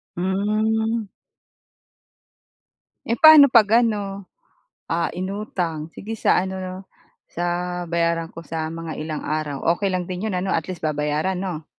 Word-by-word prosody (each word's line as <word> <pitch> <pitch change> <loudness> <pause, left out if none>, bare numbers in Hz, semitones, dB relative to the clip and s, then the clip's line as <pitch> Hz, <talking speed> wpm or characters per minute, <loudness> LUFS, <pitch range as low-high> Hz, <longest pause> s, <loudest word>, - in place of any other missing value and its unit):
Hmm. 215 +4 0 2.0
Eh, 230 - +1
paano 310 +1 +9
'pag 230 -3 +5
ano, 200 -4 -3 0.6
ah, 165 0 +1
inutang? 180 -5 -3
"Sige 215 +3 -6
sa - - +3
ano 190 +1 -4
'no, 185 0 -5 0.5
sa 175 +1 -2
bayaran 170 -1 0
ko 165 0 -11
sa 160 -1 -3
mga 165 -1 -6
ilang 155 0 -4
araw?" 150 -2 -3
Okey 200 +2 -1
lang 185 -1 -1
din 185 +4 -4
'yon 190 - -2
ano 190 +1 -1
at 165 +1 -1
least 180 -3 -6
babayaran 150 +4 -1
'no? 175 -5 -4
180 Hz, 135 wpm, -22 LUFS, 165-205 Hz, 2.0 s, paano